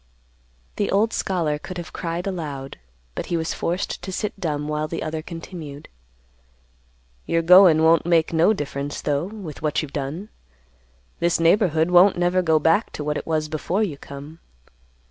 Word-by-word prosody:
The 205 - 0
old 220 +3 +2
scholar 165 -6 -1
could 185 +3 -8
have 170 -2 -7
cried 170 0 -4
aloud, 150 -8 -5 0.3
but - - -5
he 170 - 0
was 160 0 -2
forced 180 +4 -3
to 190 - -6
sit 210 +2 -4
dumb 150 -5 -2
while 150 0 -2
the 165 - -4
other 155 0 -3
continued, 165 -3 -9 1.4
"You're 165 0 +1
goin' 175 -2 +7
won't 165 +1 +4
make 165 -1 +2
no 165 +5 +4
difference, 145 -6 -3
though, 145 +2 0
with 195 -7 -8
what 155 0 0
you've 145 - -8
done. 150 +9 -4 0.9
This 170 0 +1
neighborhood 165 -1 +3
won't 180 +2 +6
never 175 +1 +2
go 160 -3 +3
back 165 +8 +2
to 150 - -5
what 150 0 -1
it - - -5
was 155 -1 0
before 165 +7 -1
you 175 -9 -2
come. 145 +3 -10
165 Hz, 165 wpm, -23 LUFS, 150-180 Hz, 1.4 s, goin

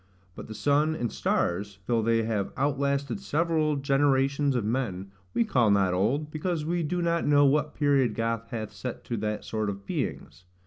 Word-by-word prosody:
But - - -9
the 110 - -8
sun 145 +8 +2
and 120 -7 -2
stars, 100 +3 -1
though 115 +1 +1
they 115 0 +2
have 110 -3 -1
outlasted 140 -3 0
several 155 -1 +1
generations 140 0 +2
of 120 -4 0
men, 105 -5 -2 0.2
we 235 - +3
call 125 - +3
not 100 -2 +3
old, 135 +12 0
because 155 0 -2
we 170 +2 0
do 175 +3 -1
not 170 0 +1
know 145 -1 +5
what 150 +2 +1
period 140 -6 +2
God 115 0 -2
hath 110 -3 -5
set 125 -2 -6
to 120 - -3
that 105 0 -3
sort 110 -2 -2
of 100 0 -6
beings. 85 -2 -4
130 Hz, 180 wpm, -27 LUFS, 110-145 Hz, 0.2 s, know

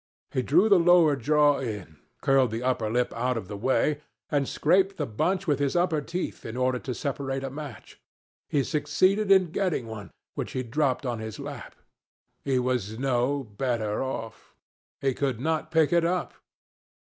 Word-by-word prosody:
He 130 - 0
drew 170 - +4
the 200 -4 +6
lower 170 -3 +5
jaw 145 +2 +3
in, 105 - -6 0.2
curled 135 -2 +3
the 115 +2 -4
upper 125 -4 0
lip 120 +2 0
out 125 +1 -1
of 110 - -5
the 100 - -6
way, 135 +7 +1 0.3
and 140 -2 +1
scraped 190 +5 +2
the 150 - -1
bunch 180 - -1
with 145 -5 +1
his 140 +1 0
upper 175 -3 +2
teeth 175 +5 -5
in 115 +2 -6
order 130 0 +1
to 125 -1 -5
separate 135 -2 -3
a 135 - -4
match. 140 -5 -9 0.5
He 140 -2 +2
succeeded 165 +9 +1
in 190 -4 +5
getting 180 -9 -1
one, 110 -3 -8 0.2
which - - -5
he 130 - -2
dropped 135 +2 0
on 120 -3 -2
his 110 -1 -6
lap. - - -8 0.7
He 135 -2 +1
was 125 -4 -1
no 135 +2 0
better 110 -1 -2
off. 115 -4 -6 0.5
He 135 -1 +1
could 130 -3 -1
not 160 +3 -1
pick 160 -1 +3
it 170 -1 +4
up. 175 +1 -1
135 Hz, 175 wpm, -27 LUFS, 120-155 Hz, 0.7 s, the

